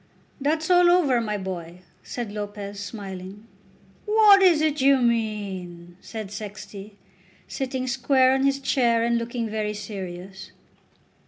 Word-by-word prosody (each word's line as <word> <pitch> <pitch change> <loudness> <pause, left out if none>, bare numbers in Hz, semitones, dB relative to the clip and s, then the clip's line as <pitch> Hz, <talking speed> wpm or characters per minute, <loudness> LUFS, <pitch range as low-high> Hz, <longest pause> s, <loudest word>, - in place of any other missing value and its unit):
"That's 315 +4 0
all 355 -1 +6
over, 295 -9 +3
my 210 -2 -2
boy," 180 -2 -7 0.2
said 235 -4 -6
Lopez, 205 -1 -6
smiling. 195 0 -8 0.6
"What 420 -2 +6
is 355 -5 +5
it 300 -2 0
you 275 +1 +5
mean?" 200 -8 -2
said 215 -3 -7
Sexty, 205 -1 -9 0.5
sitting 260 -1 -3
square 260 +1 +3
on 265 0 +1
his 275 0 +2
chair 240 -4 +2
and 235 0 +1
looking 235 0 -3
very 215 -1 -3
serious. 190 -2 -8
220 Hz, 130 wpm, -24 LUFS, 200-270 Hz, 0.6 s, all